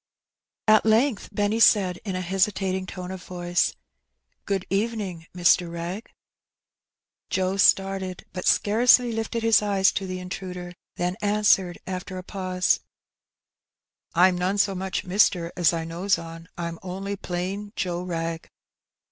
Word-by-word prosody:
At 215 0 +6
length 225 +2 +2
Benny 205 +2 0
said, 190 -5 +5
in 195 -3 -4
a 185 - -2
hesitating 190 0 0
tone 180 -1 -7
of 190 -1 -7
voice, 175 -1 0
'^ - - -25 0.7
Good 195 -2 -1
evening, 195 -5 -2
Mr. 175 0 +3
Wrag.^' 170 +6 -5 1.2
Joe 190 0 0
started, 195 -2 +2
but 180 - -4
scarcely 240 +3 +4
lifted 225 +1 -3
his 225 -2 +5
eyes 195 -2 +3
to 195 - -3
the 185 0 -4
intruder; 180 -1 -6 0.2
then 180 +2 -2
answered, 205 -4 +2
after 185 0 -5
a 185 - -6
pause 185 -1 0 0.7
— - - -40
^^Fm 180 +1 +4
none 185 +3 0
so 200 -1 +2
much 190 0 -3
mister, 180 -3 +2
as 175 -4 +3
I 165 -1 -3
knows 175 +4 0
on; 165 0 -10
Fm 170 -1 -4
only 195 +2 -5
plain 195 +2 -4
Joe 175 -1 -2
Wrag.'' 165 -2 -4
185 Hz, 140 wpm, -25 LUFS, 180-200 Hz, 1.2 s, At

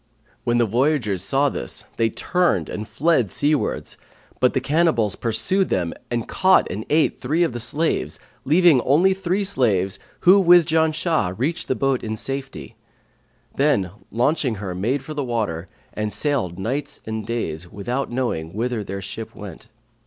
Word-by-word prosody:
When 120 0 +2
the 120 - +3
voyagers 120 - +1
saw 135 +9 +2
this, - - -5
they 115 -1 +2
turned 175 - 0
and 105 0 -5
fled 125 - +1
seawards; 150 +6 0 0.4
but 125 - +3
the - - +3
cannibals 140 -7 +1
pursued 175 - 0
them 85 -3 0 0.2
and 120 -2 -2
caught 190 0 +4
and 105 +3 -5
ate 155 +1 +2
three 155 +7 +1
of 165 - 0
the 120 - -4
slaves, 145 +7 0 0.3
leaving 160 -2 +5
only 170 +10 +4
three 190 +1 -1
slaves 105 - +1 0.2
who 190 +3 +7
with 175 -2 +6
Janshah 160 - +1
reached 145 +8 -2
the 130 - 0
boat 135 -1 0
in 110 -1 -3
safety; 135 - -5 0.8
then 135 - +2 0.2
launching 125 +1 +1
her 95 -3 -5
made 120 +10 -1
for 155 - -7
the 145 -2 -2
water 105 -9 -2 0.3
and 105 0 -2
sailed 125 - -1
nights 135 +9 -3
and 110 0 -4
days 90 -7 -4
without 120 +7 -3
knowing 100 -10 -2
whither 115 0 -1
their 95 0 -6
ship 110 +3 -7
went. 100 +1 -10
125 Hz, 160 wpm, -22 LUFS, 105-155 Hz, 0.8 s, who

